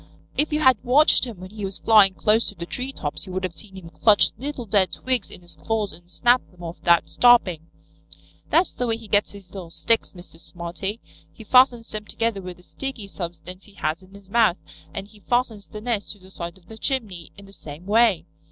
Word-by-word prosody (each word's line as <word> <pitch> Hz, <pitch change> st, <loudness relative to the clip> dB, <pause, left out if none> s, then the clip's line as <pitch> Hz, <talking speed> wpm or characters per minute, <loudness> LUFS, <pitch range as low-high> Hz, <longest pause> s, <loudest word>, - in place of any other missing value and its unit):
"If 300 Hz, +1 st, +1 dB
you 300 Hz, +1 st, 0 dB
had 260 Hz, -7 st, +4 dB
watched 270 Hz, +3 st, +5 dB
him 220 Hz, -7 st, -9 dB
when 185 Hz, +1 st, -10 dB
he 215 Hz, -1 st, -8 dB
was 195 Hz, -1 st, -2 dB
flying 205 Hz, -4 st, +5 dB
close 215 Hz, +4 st, +2 dB
to -, -, -10 dB
the 170 Hz, -, -6 dB
tree 255 Hz, +9 st, -3 dB
tops 145 Hz, -, -5 dB
you 185 Hz, -, -7 dB
would 185 Hz, +1 st, -3 dB
have 185 Hz, -2 st, -2 dB
seen 195 Hz, +3 st, -11 dB
him 165 Hz, -3 st, -11 dB
clutch 205 Hz, +5 st, +4 dB
little 270 Hz, -2 st, -5 dB
dead 195 Hz, -2 st, +2 dB
twigs 255 Hz, -5 st, -2 dB
in -, -, -12 dB
his 175 Hz, 0 st, -10 dB
claws 220 Hz, -3 st, -2 dB
and 175 Hz, +1 st, -15 dB
snap 245 Hz, +6 st, +3 dB
them 180 Hz, -1 st, -16 dB
off 170 Hz, 0 st, -7 dB
without 170 Hz, -1 st, +3 dB
stopping. 185 Hz, -10 st, +4 dB, 0.8 s
That's 345 Hz, +3 st, +3 dB
the 250 Hz, -, -2 dB
way 225 Hz, -1 st, 0 dB
he 225 Hz, -1 st, -13 dB
gets 205 Hz, 0 st, +3 dB
his 200 Hz, -3 st, -14 dB
little 185 Hz, -4 st, -8 dB
sticks, 230 Hz, +6 st, 0 dB
Mr. 175 Hz, -2 st, -14 dB
Smarty, 180 Hz, +6 st, -6 dB, 0.3 s
He 220 Hz, -, -13 dB
fastens 245 Hz, 0 st, +4 dB
them 215 Hz, 0 st, -4 dB
together 225 Hz, -2 st, -2 dB
with 180 Hz, -1 st, -8 dB
a 180 Hz, -, -19 dB
sticky 265 Hz, 0 st, -6 dB
substance 180 Hz, 0 st, -8 dB
he 205 Hz, -, -18 dB
has 155 Hz, 0 st, -2 dB
in 190 Hz, +1 st, -17 dB
his 200 Hz, -1 st, -14 dB
mouth, 215 Hz, -3 st, +3 dB, 0.3 s
and 195 Hz, 0 st, -6 dB
he 210 Hz, 0 st, -19 dB
fastens 225 Hz, -2 st, -1 dB
the 210 Hz, -, -8 dB
nest 225 Hz, -3 st, -2 dB
to -, -, -18 dB
the 190 Hz, 0 st, -17 dB
side 170 Hz, -1 st, -7 dB
of 180 Hz, -, -23 dB
the 220 Hz, +4 st, -11 dB
chimney 210 Hz, -, -3 dB
in 200 Hz, -, -12 dB
the 195 Hz, -, -14 dB
same 155 Hz, -1 st, -10 dB
way. 210 Hz, -5 st, +3 dB
200 Hz, 225 wpm, -23 LUFS, 180-230 Hz, 0.8 s, watched